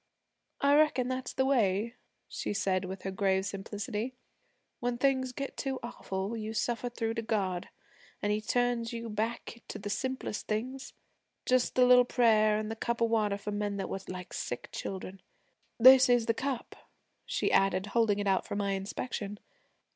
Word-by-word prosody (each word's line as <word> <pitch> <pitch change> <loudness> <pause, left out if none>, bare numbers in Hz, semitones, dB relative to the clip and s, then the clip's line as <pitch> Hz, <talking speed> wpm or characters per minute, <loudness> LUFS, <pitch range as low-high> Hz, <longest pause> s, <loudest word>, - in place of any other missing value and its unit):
I 280 0 +4
reckon 265 -5 +3
that's 255 0 -3
the 265 - +1
way,' 230 -4 +2 0.3
she - - -3
said 190 -2 +1
with 185 0 -7
her 190 - -3
grave 190 0 +1
simplicity, 210 +4 -4 0.6
'when 245 0 -1
things 260 -1 +1
get 275 +2 -5
too 270 -1 -2
awful 195 -3 -4
you 220 0 -5
suffer 240 +2 -1
through 225 -1 -2
to 230 - -2
God, 195 -5 -1 0.5
an' 205 - 0
He 210 +1 0
turns 240 0 0
you 230 -1 -5
back 230 +2 -3
to - - -6
the 205 0 -5
simplest 260 0 -3
things 255 +5 -3 0.5
just 255 -1 +2
the 250 - +6
little 250 0 +7
prayer, 215 -4 +4
an' 215 0 -3
the 225 - -3
cup 235 +1 -2
of 230 -1 +2
water 210 -3 +2
for 205 +1 -5
men 205 -1 -2
that 195 - -3
were 195 - -3
like 185 -1 -7
sick 120 - -4
children. 190 0 -6 0.6
This 260 +2 +8
is 245 -2 +4
the 230 - +2
cup,' 260 0 -3 0.5
she - - 0
added, 195 0 +3
holding 225 -3 +3
it 205 - -2
out 195 -1 +1
for - - -4
my 200 -1 0
inspection. 205 +1 -4
225 Hz, 175 wpm, -30 LUFS, 200-245 Hz, 0.6 s, This